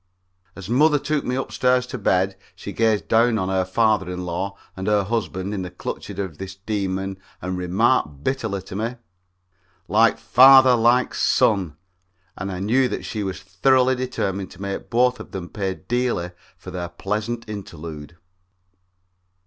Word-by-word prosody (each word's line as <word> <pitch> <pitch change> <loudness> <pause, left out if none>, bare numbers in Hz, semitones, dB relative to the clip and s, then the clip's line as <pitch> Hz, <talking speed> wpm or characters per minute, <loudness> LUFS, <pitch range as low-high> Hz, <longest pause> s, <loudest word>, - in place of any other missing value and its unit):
As 95 0 -8
mother 145 +6 +4
took 150 +1 -1
me 125 - -2
upstairs 125 -1 +1
to 125 0 -6
bed 95 -1 +1 0.2
she 100 +1 -8
gazed 110 -2 +1
down 115 0 +3
on 95 -2 -1
her 95 -1 +1
father 105 0 +1
in 90 0 -5
law 95 +3 -3 0.2
and 95 +1 -5
her 105 -1 +3
husband 100 -2 -2
in 100 - -3
the 90 - -5
clutches 90 - -6
of 95 -6 -5
this 95 0 -7
demon 95 -1 -3 0.2
and 95 0 -4
remarked 90 - +1
bitterly 110 - -2
to 95 - -9
me: 115 +4 -2 0.9
"Like - - +4
father, 130 0 +7
like 120 +2 +3
son," 90 -8 +2 0.6
and 95 +2 -5
I 90 - -4
knew 125 +6 +2
that - - -4
she 110 - -4
was 95 -2 -4
thoroughly 130 +7 +3
determined 100 -7 -3
to - - -14
make 100 0 -5
both 125 +1 +2
of - - -11
them 90 -2 -5
pay 95 -2 -3
dearly 120 -8 -1 0.3
for 90 - -10
their 90 -1 -4
pleasant 105 +6 -3
interlude. 85 -6 -8
100 Hz, 160 wpm, -22 LUFS, 95-120 Hz, 0.9 s, father